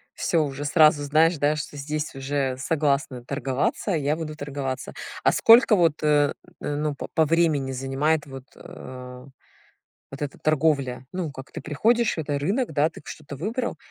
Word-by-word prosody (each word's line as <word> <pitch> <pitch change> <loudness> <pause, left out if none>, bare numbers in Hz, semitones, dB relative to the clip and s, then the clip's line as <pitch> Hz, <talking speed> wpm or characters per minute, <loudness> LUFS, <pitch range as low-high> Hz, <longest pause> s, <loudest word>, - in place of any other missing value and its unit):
Всё, 165 -3 +1
уже 140 +1 -5
сразу 150 -1 +5
знаешь, 155 +3 +3
да, 145 +2 +2
что 150 -1 -6
здесь 150 +1 -4
уже 135 -1 -2
согласны 140 -3 0
торговаться, 140 - -2
я 150 -3 +1
буду 155 -1 -5
торговаться. 140 -3 -5 0.3
А - - +5
сколько 230 -1 +6
вот, 165 -5 +2
э 150 -1 +3 0.3
э, 145 - -2
ну, 150 0 -1
п - - -6
по 160 - +4
времени 155 -4 +2
занимает 135 +4 0
вот, 135 -2 -10
э, 125 0 -10 0.9
вот 135 - -9
эта 145 -2 -4
торговля? 140 -5 +1
Ну, 180 -5 -3
как 130 -1 -11
ты - - -7
приходишь, 220 +10 +1
это 145 -3 -2
рынок, 200 - -1
да, 150 +2 +3
ты - - -13
что-то 145 -2 -9
выбрал? 230 - -3
145 Hz, 165 wpm, -24 LUFS, 140-160 Hz, 0.9 s, сколько